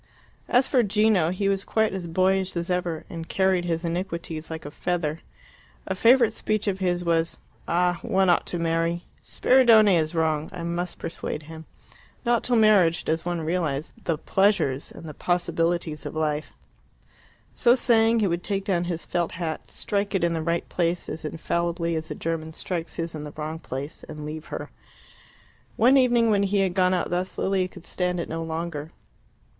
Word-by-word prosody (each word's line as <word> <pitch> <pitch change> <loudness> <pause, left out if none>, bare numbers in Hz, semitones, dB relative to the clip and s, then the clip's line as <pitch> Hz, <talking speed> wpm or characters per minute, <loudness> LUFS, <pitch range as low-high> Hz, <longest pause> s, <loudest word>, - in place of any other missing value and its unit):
As 250 +2 +4
for 255 - +3
Gino, 210 -5 +3
he 185 +3 -1
was 195 0 +1
quite 220 -2 +1
as 185 -3 -4
boyish 185 +2 +1
as 170 +1 -2
ever, 175 -3 -2
and 165 -1 -7
carried 190 -2 +2
his 170 0 -1
iniquities 170 -2 -4
like 160 -2 -6
a 145 - -6
feather. 165 -2 -2 0.7
A - - -2
favourite 230 +3 +5
speech 215 -1 -1
of 190 -1 0
his 175 -2 0
was, 165 -1 +1 0.3
"Ah, 175 0 +1
one 190 0 +2
ought 175 - +3
to 175 - -2
marry! 165 +1 0 0.2
Spiridione 230 -6 +5
is 160 0 0
wrong; 160 -1 0
I 170 - -6
must 170 +1 -3
persuade 165 -2 -5
him. 160 +1 -10 0.6
Not 235 -1 +2
till 245 - +1
marriage 205 -7 +4
does 160 +1 -1
one 175 -1 -1
realize 155 -3 -2
the 165 -3 0
pleasures 165 -7 +1
and - - -11
the 155 -2 -7
possibilities 170 -2 -1
of - - -8
life." 155 -1 -2 1.0
So 240 0 +4
saying, 230 -2 +3
he 205 - +3
would 175 0 -1
take 195 -1 -2
down 175 -3 +1
his 170 -2 -3
felt 175 -1 -1
hat, 165 -2 -4
strike 200 0 -2
it 190 - +1
in 170 -1 +2
the 165 - -1
right 170 +1 -1
place 175 0 -1
as 160 - -6
infallibly 170 +1 -1
as 160 0 -3
a - - -4
German 160 -1 -3
strikes 170 0 -4
his 165 0 -3
in 155 -2 -6
the 150 -1 -8
wrong 155 +1 -4
place, 140 0 -5
and 150 -1 -7
leave 155 +1 -6
her. - - -6 1.0
One 250 +4 +5
evening, 240 -4 +4
when 200 -1 +3
he 200 0 +2
had 190 -2 +1
gone 185 0 +3
out 175 - -2
thus, 180 +1 -2
Lilia 190 -1 +1
could 180 -2 -14
stand 180 -1 -1
it 170 - -3
no 165 +1 -3
longer. 160 -1 -4
175 Hz, 185 wpm, -25 LUFS, 165-195 Hz, 1.0 s, favourite